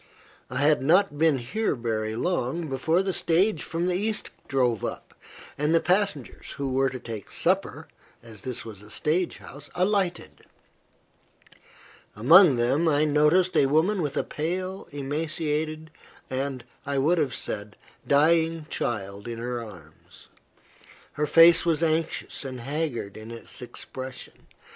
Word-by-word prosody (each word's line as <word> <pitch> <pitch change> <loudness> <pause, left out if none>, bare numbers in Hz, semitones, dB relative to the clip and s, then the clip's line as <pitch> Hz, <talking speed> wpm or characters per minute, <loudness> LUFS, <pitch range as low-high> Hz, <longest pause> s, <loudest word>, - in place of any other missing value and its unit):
I - - -4
had 150 +1 +4
not 165 +2 +3
been 160 -3 +4
here 150 - -1
very 110 -2 -2
long 165 +2 -1
before 160 +7 +1
the 190 -1 -1
stage 175 +1 +2
from 165 +1 -3
the 180 - +1
East 210 +4 -1 0.2
drove 125 -5 +1
up, - - -5 0.5
and 150 +3 +2
the - - +5
passengers, 180 - -1
who 135 -2 -3
were 135 +1 +2
to 130 - -6
take 115 -5 -8
supper, - - 0 0.4
as 110 -3 -10
this 125 -2 -5
was 105 -3 -9
a 105 - -14
stage 165 +9 0
house, 145 +1 -11
alighted. 185 -1 -1 1.7
Among 155 - +7
them, 130 +8 +1
I 150 -1 +3
noticed 150 +5 +3
a 135 - +4
woman 170 +8 +2
with 145 -4 -3
a - - +1
pale, 185 +5 -4
emaciated, 155 +2 -3 0.4
and, 130 -1 -3 0.2
I 140 -1 -2
would 160 +6 +3
have 145 -5 0
said, 105 0 -6 0.3
dying 160 +2 +3
child 100 -2 -3
in 115 -1 -5
her 120 0 -4
arms. 85 -8 -14 0.8
Her 150 0 -1
face 165 +3 +7
was 165 -1 +1
anxious 160 -1 -1
and 130 -2 -6
haggard 140 -6 -3
in 110 +1 -10
its 115 +3 -7
expression. 130 +1 -7
150 Hz, 145 wpm, -26 LUFS, 125-165 Hz, 1.7 s, Among